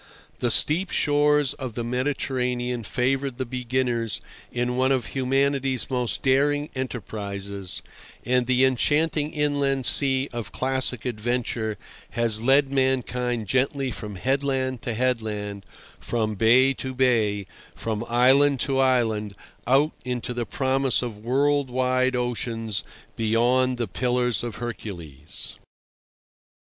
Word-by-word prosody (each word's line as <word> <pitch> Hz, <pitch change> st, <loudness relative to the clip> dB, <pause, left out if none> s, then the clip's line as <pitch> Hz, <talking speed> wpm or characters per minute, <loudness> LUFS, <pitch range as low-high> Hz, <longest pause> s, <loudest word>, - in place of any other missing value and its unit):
The 120 Hz, -, +1 dB
steep 165 Hz, -, +5 dB
shores 145 Hz, -1 st, +2 dB
of 130 Hz, -5 st, -7 dB
the 120 Hz, -, -2 dB
Mediterranean 125 Hz, -1 st, -1 dB
favoured 130 Hz, +3 st, -1 dB
the 130 Hz, -, -2 dB
beginners 120 Hz, -3 st, -1 dB, 0.3 s
in 125 Hz, 0 st, -1 dB
one 130 Hz, +1 st, +2 dB
of 130 Hz, -4 st, +1 dB
humanity's 135 Hz, -1 st, 0 dB
most 125 Hz, -2 st, -1 dB
daring 145 Hz, +2 st, +2 dB
enterprises, 100 Hz, -6 st, -5 dB, 0.4 s
and 125 Hz, 0 st, +2 dB
the 130 Hz, 0 st, +4 dB
enchanting 150 Hz, +4 st, +1 dB
inland 140 Hz, -3 st, 0 dB
sea 135 Hz, 0 st, +3 dB
of 115 Hz, -4 st, -5 dB
classic 130 Hz, -1 st, -1 dB
adventure 120 Hz, -2 st, -2 dB, 0.4 s
has 115 Hz, -2 st, +1 dB
led 135 Hz, +3 st, +4 dB
mankind 125 Hz, -3 st, 0 dB
gently 135 Hz, +4 st, 0 dB
from 105 Hz, -2 st, -7 dB
headland 130 Hz, +2 st, -1 dB
to 120 Hz, -3 st, -3 dB
headland, 105 Hz, -5 st, -2 dB, 0.3 s
from 110 Hz, -2 st, -1 dB
bay 120 Hz, +6 st, +4 dB
to 130 Hz, -1 st, -6 dB
bay, 110 Hz, -6 st, +2 dB, 0.3 s
from 110 Hz, -1 st, -3 dB
island 135 Hz, +3 st, +4 dB
to 135 Hz, -2 st, 0 dB
island, 110 Hz, -6 st, +1 dB, 0.3 s
out 140 Hz, +5 st, +4 dB
into 125 Hz, -1 st, -3 dB
the 120 Hz, -1 st, -3 dB
promise 135 Hz, -1 st, +1 dB
of 115 Hz, -4 st, -5 dB
world 140 Hz, +3 st, +1 dB
wide 130 Hz, 0 st, +1 dB
oceans 115 Hz, -3 st, -2 dB, 0.3 s
beyond 120 Hz, +3 st, +2 dB
the 120 Hz, -2 st, -2 dB
Pillars 125 Hz, -2 st, 0 dB
of 120 Hz, -2 st, -4 dB
Hercules. 95 Hz, -, -8 dB
125 Hz, 120 wpm, -24 LUFS, 115-135 Hz, 0.4 s, steep